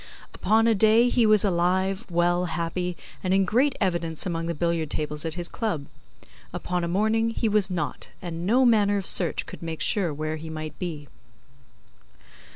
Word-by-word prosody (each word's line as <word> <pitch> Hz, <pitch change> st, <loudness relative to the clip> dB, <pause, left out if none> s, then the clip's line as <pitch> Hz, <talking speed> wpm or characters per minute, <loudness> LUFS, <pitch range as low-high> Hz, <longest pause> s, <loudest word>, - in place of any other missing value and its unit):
Upon 220 Hz, +4 st, +2 dB
a 230 Hz, -, +4 dB
day 220 Hz, +3 st, +4 dB
he 240 Hz, -2 st, +3 dB
was 215 Hz, -1 st, +5 dB
alive, 190 Hz, +3 st, 0 dB
well, 175 Hz, +1 st, +1 dB
happy, 175 Hz, +1 st, -3 dB, 0.3 s
and 185 Hz, 0 st, +1 dB
in 195 Hz, 0 st, +3 dB
great 255 Hz, +9 st, +2 dB
evidence 170 Hz, -5 st, -1 dB
among 165 Hz, -2 st, -2 dB
the 170 Hz, -, -2 dB
billiard 170 Hz, -1 st, -1 dB
tables 150 Hz, +1 st, -3 dB
at 160 Hz, 0 st, -3 dB
his 175 Hz, -1 st, -2 dB
Club. 170 Hz, -12 st, -3 dB, 0.7 s
Upon 180 Hz, -1 st, -3 dB
a -, -, -1 dB
morning, 220 Hz, +5 st, +1 dB
he 225 Hz, 0 st, -1 dB
was 210 Hz, -2 st, +2 dB
not, 165 Hz, -5 st, -4 dB
and 170 Hz, -1 st, -6 dB
no 245 Hz, +8 st, +3 dB
manner 205 Hz, -4 st, +3 dB
of 195 Hz, -, -3 dB
search 175 Hz, -1 st, +2 dB
could -, -, -10 dB
make 165 Hz, -1 st, -5 dB
sure 195 Hz, -7 st, +1 dB
where 155 Hz, +2 st, -3 dB
he 160 Hz, +1 st, -8 dB
might 155 Hz, -2 st, -7 dB
be. 155 Hz, -5 st, -5 dB
180 Hz, 175 wpm, -25 LUFS, 165-210 Hz, 0.7 s, was